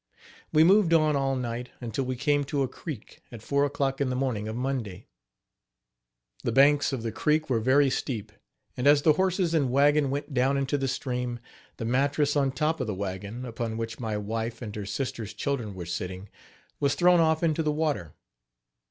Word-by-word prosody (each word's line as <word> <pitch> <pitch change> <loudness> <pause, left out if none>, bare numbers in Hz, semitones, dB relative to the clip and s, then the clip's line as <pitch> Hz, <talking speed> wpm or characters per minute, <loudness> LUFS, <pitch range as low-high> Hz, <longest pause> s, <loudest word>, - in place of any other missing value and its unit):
We 155 - +6
moved 185 -1 +5
on 155 -2 +3
all 135 -1 +1
night, 125 -1 -4
until 125 +2 -3
we 130 0 -2
came 145 +3 +1
to 140 0 0
a - - 0
creek, 130 - -9
at 115 -3 -10
four 140 +3 +2
o'clock 140 -1 -1
in 135 - +1
the 125 - -1
morning 125 -5 -1
of 110 - -4
Monday. 120 -7 -3 1.4
The - - 0
banks 140 +4 +4
of 130 -4 -3
the 115 - -2
creek 155 +2 0
were 115 - +3
very 135 +4 +3
steep, 110 -6 -3 0.4
and 125 - 0
as 145 0 +6
the 155 - +6
horses 185 0 +1
and 145 -5 +2
wagon 145 +2 +3
went 145 +2 -4
down 135 +2 +2
into 140 +1 0
the 135 -1 0
stream, 125 -2 -3 0.4
the 115 - -4
mattress 140 +4 +1
on 140 -2 +2
top 155 +3 -1
of 125 - -2
the 105 - -2
wagon, 100 +5 -5
upon 115 -2 -4
which 115 -1 -5
my 110 -3 -2
wife 115 +2 -3
and 105 -3 -6
her 105 -2 -5
sister's 115 -3 -4
children 120 -8 -3
were 90 -2 -6
sitting, 90 +3 -5 0.5
was 140 -1 +1
thrown 175 0 +5
off 160 0 +2
into 160 -1 +2
the 155 -1 +1
water. 150 - -2
135 Hz, 195 wpm, -27 LUFS, 115-145 Hz, 1.4 s, We